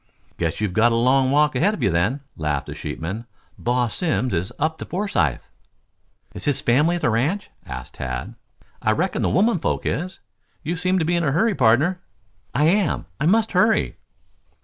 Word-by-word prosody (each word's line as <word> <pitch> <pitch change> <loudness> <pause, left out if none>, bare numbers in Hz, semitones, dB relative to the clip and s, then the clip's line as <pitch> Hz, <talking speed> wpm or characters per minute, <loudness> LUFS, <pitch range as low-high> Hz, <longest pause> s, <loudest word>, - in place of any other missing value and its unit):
"Guess 80 -2 -1
you've 105 -4 -1
got 115 +4 +4
a - - +2
long 130 +3 +3
walk 150 +2 +3
ahead 205 +6 +2
of - - -5
you 100 - +3
then," 100 - +1
laughed 75 -3 -2
the - - -7
sheepman. 100 +9 -5 0.3
"Boss 120 -2 0
Simms 130 - 0
is 85 +3 -1
up 160 +2 -1
to - - -5
Forsythe." 100 - 0 0.9
"Is - - -8
his 145 -3 +1
family 150 +8 +3
at 175 - -5
the 120 - +3
ranch?" 150 - 0 0.2
asked 65 0 -7
Tad. 65 - -5 0.5
"I 110 -1 +2
reckon 180 - -1
the - - +1
women 205 +1 +3
folks - - -1
is. 180 +3 -2 0.4
You 165 +3 -2
seem 185 +2 +1
to 165 - +1
be 175 +2 +1
in 170 - +1
a 145 - +1
hurry, 220 +8 +2
pardner." 145 +7 +3 0.5
"I 145 - +1
am. 180 0 +2
I 150 - +1
must 220 +4 +3
hurry." 220 +5 +2
140 Hz, 190 wpm, -22 LUFS, 110-175 Hz, 0.9 s, got